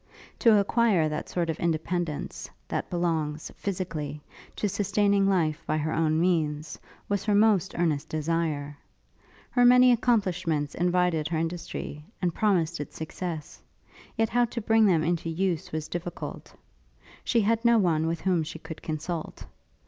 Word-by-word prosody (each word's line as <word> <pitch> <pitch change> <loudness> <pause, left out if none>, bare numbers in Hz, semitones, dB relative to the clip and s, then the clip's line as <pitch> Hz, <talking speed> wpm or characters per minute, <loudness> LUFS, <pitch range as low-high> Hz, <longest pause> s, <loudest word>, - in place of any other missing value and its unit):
To 225 -4 +6
acquire 200 -5 +3
that 150 - -4
sort 175 -2 -1
of 155 - -7
independence, 170 -1 -2 0.2
that - - -3
belongs, 160 -4 -1
physically, 165 -7 -4 0.4
to 210 - -1
sustaining 200 0 +2
life 165 -4 +1
by 155 - +1
her 155 +1 -1
own 160 -1 +2
means, 155 -3 0 0.3
was 200 -1 -1
her 210 -2 +2
most 205 -3 +3
earnest 160 -5 0
desire: 155 -2 -1 0.8
Her 245 - +3
many 250 +1 +7
accomplishments 185 - +1
invited 175 -3 +1
her 165 0 -2
industry, 165 -2 -4 0.2
and 180 -2 0
promised 175 -6 +1
it 145 - -7
success; 160 -1 -6 0.6
yet 225 0 +2
how 245 +1 +3
to 235 0 -5
bring 225 0 +4
them 165 -5 +3
into 170 0 -1
use 175 0 -1
was 155 -1 -3
difficult. 175 0 -6 0.7
She 235 - +2
had 225 +2 +1
no 235 -1 +5
one 165 -6 +2
with 165 0 -2
whom 180 -3 +2
she 155 +1 -6
could 160 0 -9
consult. 160 +1 -5
170 Hz, 150 wpm, -27 LUFS, 155-200 Hz, 0.8 s, many